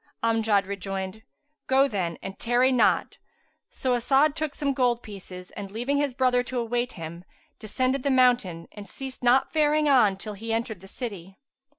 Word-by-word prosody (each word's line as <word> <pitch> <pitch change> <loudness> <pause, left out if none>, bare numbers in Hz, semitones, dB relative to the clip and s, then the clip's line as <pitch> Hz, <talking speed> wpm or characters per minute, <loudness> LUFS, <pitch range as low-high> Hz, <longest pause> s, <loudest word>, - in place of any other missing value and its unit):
Amjad 225 -3 +2
rejoined, 195 +1 -5 0.5
"Go 270 +1 +4
then 185 -8 -2
and 195 0 -7
tarry 245 +2 +3
not. 250 - +2 0.5
So 255 -1 -1
As'ad 275 +5 +3
took 310 -3 -3
some 280 -2 0
gold 245 -2 +1
pieces, 185 -3 -10
and 200 -1 -7
leaving 245 +7 -1
his 285 -3 0
brother 255 -1 +3
to 250 +1 -5
await 240 +1 -1
him, 165 +1 -8 0.4
descended 255 +5 -1
the 280 - 0
mountain 245 -10 +2
and 205 -2 -10
ceased 265 +3 -6
not 245 +2 +3
faring 305 -1 +3
on 235 -9 +4
till 210 +2 -7
he 225 +3 -6
entered 225 -4 -2
the 195 - -12
city. 195 -5 -7
235 Hz, 170 wpm, -26 LUFS, 195-260 Hz, 0.5 s, Go